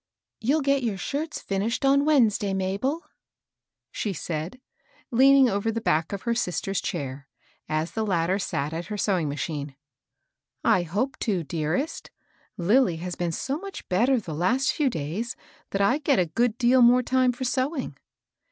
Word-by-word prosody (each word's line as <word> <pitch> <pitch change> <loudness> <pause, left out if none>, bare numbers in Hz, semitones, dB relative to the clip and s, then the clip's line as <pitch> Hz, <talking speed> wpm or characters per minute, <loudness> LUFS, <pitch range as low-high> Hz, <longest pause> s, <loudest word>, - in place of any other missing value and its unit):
" - - -61
You'll 285 +7 +2
get 275 0 +2
your 225 -5 -1
shirts 300 - -3
finished 205 +7 -1
on 280 +1 +4
Wednesday, 215 -9 +3
Mabel? 200 - -1 0.4
" - - -64 0.3
she 205 - -2
said, 165 - -5 0.5
leaning 270 +2 +6
over 205 +1 0
the 230 - -2
back 160 -7 0
of 200 -1 -5
her 235 - +1
sister's 195 -3 -1
chair, 140 -4 -5 0.4
as 155 +2 -1
the 220 - -2
latter 185 -1 +1
sat 150 -5 -2
at 170 +2 -4
her 210 - -4
sewing 185 -7 +1
ma 140 - -3
chine. 145 -1 -4 0.5
" - - -55
I - - +2
hope 200 +11 -2
to, 195 -7 0
dearest. 160 - -2 0.5
Lilly 195 +1 +3
has 175 +2 -5
been 175 -1 -2
so 275 - -3
much 395 +1 -8
better 240 +8 +3
the 175 -7 -7
last 250 - +1
few 295 -4 +1
days 175 - -4 0.3
that 195 - -1
I 255 +9 +3
get 285 -4 +2
a 180 - +3
good 230 +7 0
deal 250 +1 +4
more 245 +1 +6
time 255 0 +2
for 245 +2 -6
sewing." 260 - -1
210 Hz, 175 wpm, -25 LUFS, 175-260 Hz, 0.5 s, leaning